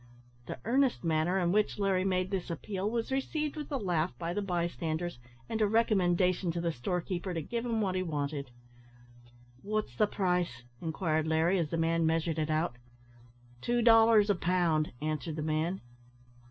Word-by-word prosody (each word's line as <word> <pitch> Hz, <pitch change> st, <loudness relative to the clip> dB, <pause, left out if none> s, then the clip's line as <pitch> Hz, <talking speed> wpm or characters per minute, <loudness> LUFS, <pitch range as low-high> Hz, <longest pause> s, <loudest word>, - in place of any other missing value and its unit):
The -, -, -5 dB
earnest 260 Hz, +1 st, +2 dB
manner 165 Hz, +3 st, +1 dB
in 175 Hz, -2 st, +1 dB
which 210 Hz, +2 st, +1 dB
Larry 195 Hz, -2 st, +1 dB
made 185 Hz, 0 st, 0 dB
this 190 Hz, -3 st, -2 dB
appeal 190 Hz, +4 st, -3 dB
was 230 Hz, +2 st, -2 dB
received 295 Hz, +3 st, -1 dB
with 300 Hz, -1 st, -6 dB
a 280 Hz, -, 0 dB
laugh 175 Hz, -6 st, -1 dB
by 170 Hz, 0 st, -3 dB
the 205 Hz, -, -1 dB
bystanders, 170 Hz, -4 st, -2 dB, 0.3 s
and 225 Hz, -, -2 dB
a 210 Hz, -, +4 dB
recommendation 185 Hz, -5 st, +2 dB
to 170 Hz, -, -2 dB
the 170 Hz, 0 st, 0 dB
store 170 Hz, +7 st, -2 dB
keeper 180 Hz, 0 st, -4 dB
to 165 Hz, -, -1 dB
give 235 Hz, +7 st, -3 dB
him 225 Hz, -2 st, 0 dB
what 190 Hz, -3 st, 0 dB
he 185 Hz, -, 0 dB
wanted. 145 Hz, -4 st, -3 dB, 1.1 s
"What's 210 Hz, -, -2 dB
the 210 Hz, -, +3 dB
price?" 180 Hz, -, -1 dB, 0.2 s
inquired 160 Hz, -1 st, -1 dB
Larry, 160 Hz, +4 st, +2 dB
as 160 Hz, -3 st, -1 dB
the 165 Hz, -, -2 dB
man 165 Hz, 0 st, +2 dB
measured 160 Hz, 0 st, 0 dB
it 155 Hz, 0 st, -1 dB
out. 155 Hz, -5 st, 0 dB, 0.8 s
"Two 240 Hz, -, +1 dB
dollars 225 Hz, -2 st, +6 dB
a -, -, +2 dB
pound," 170 Hz, -3 st, +1 dB
answered 155 Hz, 0 st, -2 dB
the 155 Hz, -, -3 dB
man. 160 Hz, +4 st, -1 dB
180 Hz, 175 wpm, -31 LUFS, 160-205 Hz, 1.1 s, dollars